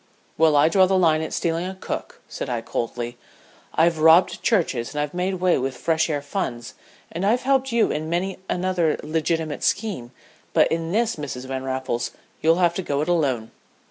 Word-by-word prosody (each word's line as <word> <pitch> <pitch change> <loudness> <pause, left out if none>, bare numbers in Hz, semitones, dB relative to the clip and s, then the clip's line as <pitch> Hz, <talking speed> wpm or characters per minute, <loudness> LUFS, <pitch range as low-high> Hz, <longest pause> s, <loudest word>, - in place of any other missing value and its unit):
"Well, 160 -2 +4
I 145 +2 +6
draw 185 +3 +4
the 190 0 +2
line 160 -3 +3
at 160 - -4
stealing 170 +1 -1
a 190 - -6
cook," - - -6
said - - -5
I, 120 -2 -1
coldly. 120 +1 -4 0.6
"I've 165 0 +3
robbed 160 +3 +5
churches 150 - 0
and - - -1
I've 150 -1 -2
made 180 +2 -1
way 180 -3 +2
with 130 -1 -3
fresh 160 +5 +1
air 145 -2 -2
funds, 125 -7 -4 0.4
and 170 +3 -4
I've 225 +5 +2
helped 270 0 +2
you 230 -1 +2
in 155 +1 -3
many 185 +3 -2
another 180 -3 +1
legitimate 160 0 -1
scheme, 195 - -1 0.4
but - - +4
in 165 0 -1
this, 230 +1 +1
Mrs. 135 -4 -6
Van 130 0 -4
Raffles, 130 -2 -2 0.3
you'll 165 +1 +4
have 175 -1 +2
to 190 - -3
go 145 -5 -1
it 155 - -2
alone." 135 -10 0
160 Hz, 190 wpm, -23 LUFS, 140-185 Hz, 0.6 s, I